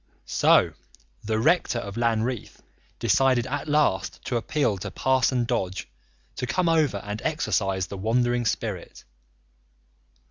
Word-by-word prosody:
So - - +4 0.5
the 110 +1 -1
rector 155 +1 +2
of 100 -4 -5
Lanreath 115 0 -1 0.4
decided 130 -3 +3
at 145 +3 -4
last 145 - +1
to 125 - -2
appeal 115 -3 0
to - - -5
Parson 130 -2 +1
Dodge 95 -6 -2 0.5
to 125 - -3
come 180 +8 +1
over 155 -9 +2
and 105 +1 -5
exorcise 95 - 0
the 95 +3 -8
wandering 120 +3 +1
spirit. - - -4
120 Hz, 120 wpm, -25 LUFS, 105-135 Hz, 0.5 s, So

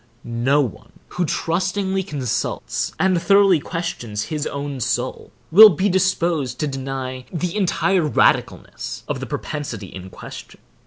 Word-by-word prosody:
No 120 +5 +1
one 125 -8 -6 0.2
who 180 - -1
trustingly 190 +4 -1
consults 145 - -2
and 185 -3 +2
thoroughly 195 -1 +5
questions 140 -11 -4
his 150 -1 -2
own 140 -1 -4
soul, 120 - -2 0.2
will 215 +6 +11
be 190 +3 +1
disposed 175 -7 0
to - - +1
deny 135 -1 -4
the 175 +1 -3
entire 195 -1 +2
radicalness - - 0
of - - -2
the - - -5
propensity 120 -10 -5
in 95 0 -8
question. - - -11
155 Hz, 130 wpm, -21 LUFS, 130-185 Hz, 0.2 s, will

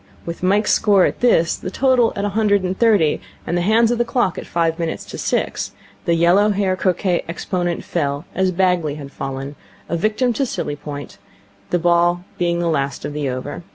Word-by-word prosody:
With 170 0 -6
Mike's 200 +3 +2
score 200 -3 +4
at - - -2
this, 170 -9 +3
the - - -6
total 250 +2 +3
at 200 - -2
a - - 0
hundred 205 -1 +2
and 185 +1 -1
thirty, 200 -9 +3 0.2
and 175 - -1
the 175 - +1
hands 225 +5 +3
of 240 - -1
the - - +4
clock 240 -6 0
at - - -9
five 165 0 0
minutes 165 -1 -3
to - - -8
six, - - -1 0.3
the 170 - +2
yellow 175 +5 +4
haired 195 -2 0
croquet 180 -1 +1
exponent 175 0 -2
fell, 145 -2 -2
as 190 0 +1
Bagley 180 -5 +1
had 140 -2 -9
fallen, 135 +1 -5 0.3
a 170 - -2
victim 215 +7 +1
to 275 - 0
silly 145 - -3
point, 145 -6 -8 0.5
the 175 - +2
ball 175 +1 +2 0.2
being 170 -1 +1
the 170 0 0
last 140 -4 -1
of 145 - -4
the 145 -2 -2
over. 130 +5 -5
175 Hz, 200 wpm, -20 LUFS, 165-205 Hz, 0.5 s, score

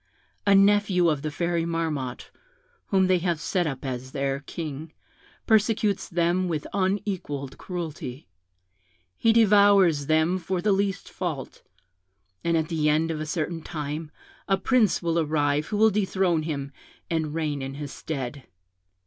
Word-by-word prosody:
A 200 - +6
nephew 195 -3 +4
of 150 -3 0
the 155 - -2
Fairy 170 +2 -1
Marmotte, 160 -7 -3 0.6
whom 190 -1 +3
they 185 -1 +3
have 170 -2 -1
set 175 +2 0
up 135 -2 -5
as 130 0 -5
their 135 -1 -1
king, 155 +1 -7 0.5
persecutes 215 -2 +2
them 175 +1 +1
with 155 -4 -2
unequalled 185 -8 -2
cruelty: 160 -7 -6 0.9
he 225 - +3
devours 200 -8 +5
them 160 +4 +2
for 185 +1 -2
the 205 +3 +1
least 195 0 0
fault; 160 -8 -5 0.8
and 170 0 +2
at 160 -1 0
the 155 -3 +1
end 160 +2 +2
of 155 -1 -3
a 155 - -4
certain 165 +1 -2
time 155 0 -5 0.4
a 195 - +3
prince 220 -2 +2
will 170 0 +1
arrive 150 -1 +1
who 210 - -2
will 220 +1 +5
dethrone 190 -4 +1
him, 140 -3 -4 0.4
and 160 -2 -1
reign 150 -3 -1
in 135 0 -5
his 145 -1 -6
stead. 135 -3 -5
165 Hz, 150 wpm, -26 LUFS, 150-190 Hz, 0.9 s, A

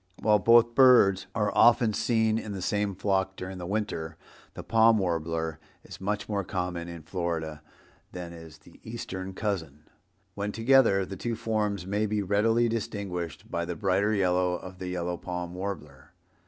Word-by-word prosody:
While 105 -1 +4
both 115 +3 +5
birds 120 -7 +5
are 105 -2 +1
often 115 -1 +5
seen 110 0 +1
in 105 -2 -6
the 95 - -5
same 100 0 -1
flock 95 0 0
during 95 0 -7
the 90 - -6
winter, 90 -6 -3 0.4
the - - -7
Palm 115 0 +4
Warbler 80 -3 -2 0.2
is - - -11
much 105 +2 -2
more 100 -2 -1
common 90 -2 -3
in 85 -2 -8
Florida 80 -3 -3 0.5
than 90 -1 -7
is 80 -2 -12
the 75 +2 -19
eastern 95 -4 -6
cousin. 80 -9 -3 0.5
When 100 +1 -3
together 115 -4 +4
the 95 +1 -8
two 120 -1 -3
forms 105 -4 -1
may 105 +3 0
be 105 0 -1
readily 115 +4 +2
distinguished 100 -8 -4
by 85 - -1
the 85 0 -4
brighter 100 +3 +1
yellow 90 -2 +2
of 90 +1 -9
the 90 - -5
yellow 90 -1 -3
palm 90 -1 -5
warbler. 80 -6 -7
95 Hz, 165 wpm, -28 LUFS, 85-105 Hz, 0.5 s, both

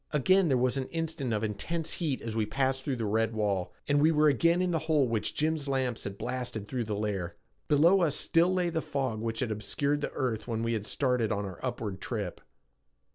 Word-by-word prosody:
Again 185 +6 +3
there 135 -4 +3
was 125 +2 +1
an 130 -1 -2
instant 160 -6 -3
of 105 0 0
intense 150 +11 -2
heat 150 -6 -1
as 115 -1 -4
we 110 -2 0
passed 135 +2 0
through 135 -2 -1
the 115 -2 -2
red 110 +2 +1
wall, 100 -4 0 0.2
and 145 0 +3
we 155 +2 +5
were 155 -1 +5
again 170 +6 +3
in 180 -1 +1
the 165 - +1
hole 150 -4 +4
which 115 -2 -1
Jim's 155 -1 0
lamps 130 -4 -1
had 100 0 -5
blasted 120 -5 -4
through 125 -1 -2
the 105 -1 -2
layer. 100 -5 -2 0.3
Below 170 +6 +5
us 155 -4 +2
still 170 +2 +3
lay 180 -2 +1
the 160 -1 -1
fog 130 -8 -2
which 115 0 -2
had 120 -4 -1
obscured 140 +7 -1
the - - -2
earth 120 -5 -2
when 115 -1 -2
we 115 0 0
had 105 -2 -3
started 125 -5 +1
on 100 0 -1
our 95 -3 -7
upward 115 -6 -4
trip. 105 -7 -4
130 Hz, 225 wpm, -29 LUFS, 110-150 Hz, 0.3 s, we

